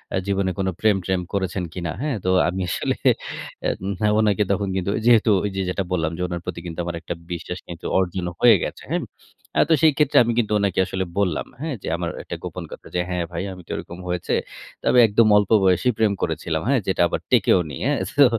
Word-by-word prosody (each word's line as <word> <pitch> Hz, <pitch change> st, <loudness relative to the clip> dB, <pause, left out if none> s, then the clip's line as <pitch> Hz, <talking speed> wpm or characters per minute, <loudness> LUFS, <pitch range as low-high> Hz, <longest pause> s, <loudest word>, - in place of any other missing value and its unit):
আ -, -, +2 dB
জীবনে 95 Hz, -1 st, +1 dB
কোনো 95 Hz, -1 st, 0 dB
প্রেম-ট্রেম 95 Hz, -4 st, +1 dB
করেছেন 95 Hz, -2 st, -1 dB
কিনা?" 85 Hz, -3 st, -3 dB
হ্যাঁ, 145 Hz, -5 st, -1 dB
তো 95 Hz, -, +3 dB, 0.2 s
আমি 95 Hz, +2 st, -3 dB
আসলে -, -, -1 dB, 0.7 s
এন 100 Hz, +2 st, -3 dB
ওনাকে 105 Hz, -1 st, +3 dB
তখন 100 Hz, 0 st, 0 dB
কিন্তু 95 Hz, +1 st, -1 dB
যেহেতু 115 Hz, -2 st, +5 dB
ওই 105 Hz, -, 0 dB
যে 95 Hz, -, -1 dB
যেটা 95 Hz, +1 st, -1 dB
বললাম, 80 Hz, -3 st, 0 dB
যে 90 Hz, -, -5 dB
উনার 85 Hz, -1 st, -4 dB
প্রতি 90 Hz, -2 st, -4 dB
কিন্তু 85 Hz, -1 st, -6 dB
আমার 85 Hz, -, -3 dB
একটা 85 Hz, -, -4 dB, 0.2 s
বিশ্বাস 90 Hz, +1 st, -5 dB
কিন্তু 85 Hz, -1 st, -9 dB
অর্জন 90 Hz, -1 st, -1 dB
হয়ে 115 Hz, -3 st, +7 dB
গেছে -, -, -5 dB
হ্যাঁ। -, -, 0 dB, 0.6 s
আ -, -, +7 dB
তো -, -, +6 dB
সেই 155 Hz, -, +6 dB
ক্ষেত্রে 150 Hz, -2 st, +3 dB
আমি 120 Hz, 0 st, 0 dB
কিন্তু 110 Hz, -2 st, 0 dB
ওনাকে 100 Hz, -3 st, 0 dB
আসলে 95 Hz, 0 st, -3 dB
বললাম, 90 Hz, -5 st, 0 dB, 0.2 s
হ্যাঁ 160 Hz, -3 st, -2 dB
যে -, -, -6 dB
আমার -, -, -2 dB
একটা -, -, -6 dB
গোপন -, -, -5 dB
কথা -, -, -10 dB
যে, 90 Hz, -, +2 dB
"হ্যাঁ 90 Hz, -1 st, -1 dB
ভাই, 85 Hz, +1 st, -3 dB
আমি 90 Hz, -, -11 dB
তো -, -, -8 dB
ওরকম 85 Hz, -, -7 dB
হয়েছে। 90 Hz, -1 st, -2 dB, 0.5 s
তবে 125 Hz, -, +4 dB
একদম 110 Hz, +1 st, +4 dB
অল্প 105 Hz, -2 st, +1 dB
বয়সী 95 Hz, +6 st, +3 dB
প্রেম 110 Hz, -2 st, +3 dB
করেছিলাম 80 Hz, 0 st, -1 dB
হ্যাঁ, 135 Hz, 0 st, +3 dB
যেটা 95 Hz, -, +1 dB
আবার -, -, -2 dB
টেকেওনি।" 80 Hz, -7 st, +3 dB
হ্যাঁ। -, -, +1 dB, 0.2 s
তো 140 Hz, -, +10 dB
95 Hz, 210 wpm, -22 LUFS, 90-105 Hz, 0.7 s, তো